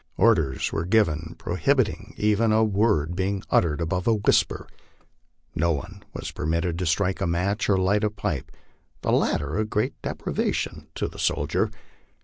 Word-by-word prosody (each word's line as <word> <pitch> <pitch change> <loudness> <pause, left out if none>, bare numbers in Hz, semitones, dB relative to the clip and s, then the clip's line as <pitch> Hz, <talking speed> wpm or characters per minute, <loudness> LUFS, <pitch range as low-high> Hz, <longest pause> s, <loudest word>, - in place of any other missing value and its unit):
Orders 80 - +2
were 80 - 0
given 85 -5 +1
prohibiting 105 - 0
even 105 +1 +2
a 110 +1 +4
word 100 -7 +2
being 95 +1 -1
uttered 80 -3 +3
above 90 +2 -1
a 115 - +5
whisper. 105 - +2 0.9
No 85 +2 +2
one 90 +7 -6
was - - -6
permitted 85 +2 -1
to 90 - -1
strike 90 +4 +1
a 95 - +1
match 90 +6 0
or 100 - +4
light 100 +3 +2
a 105 - +3
pipe 105 - -4 0.5
the - - 0
latter 75 +6 +1
a - - +2
great 105 0 -1
deprivation - - -2
to - - -1
the - - -11
soldier. - - +1
95 Hz, 155 wpm, -25 LUFS, 85-105 Hz, 0.9 s, a